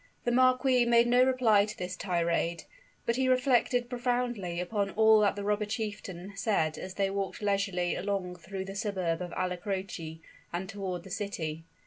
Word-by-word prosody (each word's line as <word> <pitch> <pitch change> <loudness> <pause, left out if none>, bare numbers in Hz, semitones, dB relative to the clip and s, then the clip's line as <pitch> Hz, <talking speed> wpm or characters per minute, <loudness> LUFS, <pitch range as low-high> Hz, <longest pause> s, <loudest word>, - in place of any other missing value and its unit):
The 240 - +1
marquis 255 0 +4
made 235 0 +5
no 245 +1 +5
reply 240 -6 +4
to 215 - -8
this 180 0 -4
tirade; 170 -2 0 0.4
but 235 - +1
he 260 0 +2
reflected 250 -1 +2
profoundly 240 -7 -1
upon 200 +2 -1
all 220 +1 +5
that 205 -1 +3
the 205 - -4
robber 210 +1 0
chieftain 205 -4 -5
said 195 -7 +1
as 185 0 -7
they 195 -1 0
walked 195 -1 -3
leisurely 195 -4 0
along 190 -2 -2
through 190 +3 -6
the 195 - -7
suburb 190 -5 -1
of 175 -1 -5
Alla 180 0 -1
Croce, 180 -4 -5 0.3
and 180 +2 -3
toward 190 -3 -4
the 190 - -11
city. 165 -6 -4
200 Hz, 170 wpm, -30 LUFS, 180-235 Hz, 0.4 s, made